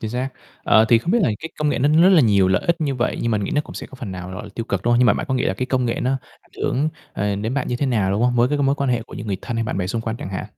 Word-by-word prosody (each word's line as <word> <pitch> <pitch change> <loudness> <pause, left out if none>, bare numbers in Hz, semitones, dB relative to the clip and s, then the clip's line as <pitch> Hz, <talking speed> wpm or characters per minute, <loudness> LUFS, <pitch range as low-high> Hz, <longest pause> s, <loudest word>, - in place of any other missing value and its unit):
chính 110 - -4
xác. 125 +2 -2 0.4
Ờ, 110 - +5
thì 115 - +6
không 165 +10 -3
biết 240 - +4
là 130 - +3
cái 160 - -6
công 150 - +1
nghệ 145 - 0
nó 140 +3 +3
rất 185 - +7
là 185 -5 +6
nhiều 100 -6 +4
lợi 95 -1 +2
ích 170 0 +1
như 145 -3 0
vậy 125 -1 -1
nhưng 115 - 0
mình 105 -2 0
nghĩ - - -3
nó 150 - +3
cũng - - -10
sẽ - - -6
có - - -14
phần 125 -7 -7
nào, 90 0 -7
gọi 95 +3 -6
là, - - -9
tiêu 115 - -3
cực, 100 -4 -2
đúng 120 +2 +2
không? 120 - +4
Nhưng 125 - +5
mà 105 - +6
bạn 160 - -3
có 130 - 0
nghĩ 125 - 0
là 95 - 0
cái 130 +6 -3
công 130 -1 0
nghệ 115 - -2
nó 130 - 0 0.3
ảnh - - -30
hưởng, 145 +4 +1 0.2
ờ, 100 0 -1
đến 110 +5 -3
bạn 140 - -1
như 120 - -1
thế 140 - -1
nào 105 -7 +1
đúng 100 +3 0
không? 125 0 +2
Mối 120 +1 +4
cái 145 +1 0
mối 140 0 +2
quan 140 -2 -1
hệ 120 -2 0
của - - -12
những - - -7
người 100 -2 -1
thân 120 -2 -4
hay 115 - 0
bạn 105 - -3
bè 90 - -1
xung 115 +5 -2
quanh 115 0 -3
chẳng 95 - -7
hạn? 95 - -4
120 Hz, 390 wpm, -21 LUFS, 105-135 Hz, 0.4 s, rất